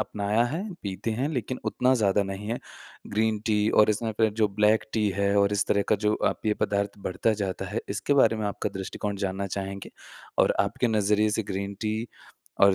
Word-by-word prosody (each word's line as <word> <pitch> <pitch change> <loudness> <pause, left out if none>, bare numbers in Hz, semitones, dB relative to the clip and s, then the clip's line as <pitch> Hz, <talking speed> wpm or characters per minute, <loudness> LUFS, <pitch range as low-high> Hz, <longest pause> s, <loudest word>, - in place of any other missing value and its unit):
अपनाया 105 +2 0
है, 155 +10 -2 0.2
पीते 100 +3 -3
हैं 125 +6 -1
लेकिन 130 -4 -3
उतना 130 +1 +2
ज़्यादा 105 -4 +2
नहीं 95 +1 -5
है, 120 - -1 0.5
ग्रीन 110 +1 +1
टी 105 -1 +2
और 105 0 +5
इसमें 110 +2 -1
फ़िर 110 -1 +4
जो 105 - +4
ब्लैक 105 0 +3
टी 105 -2 +2
है 100 0 +2
और 100 0 +3
इस 100 0 +1
तरह 100 - +2
का 110 - +4
जो 105 - +3
अ, - - +1
पेय 110 -1 +1
पदार्थ 100 0 -2
बढ़ता 95 +5 +1
जाता 95 -2 -3
है - - -2
इसके 145 - 0
बारे 110 -2 +4
में 110 -1 -2
आपका 100 - -2
दृष्टिकोण 100 +2 -4
जानना 95 +1 -3
चाहेंगे? 100 0 -5 0.5
और - - +4
आपके 120 +5 0
नज़रिए 105 0 +2
से - - +2
ग्रीन 100 +1 -3
टी 110 +1 -2 0.6
और 100 - +5
105 Hz, 205 wpm, -26 LUFS, 100-110 Hz, 0.6 s, और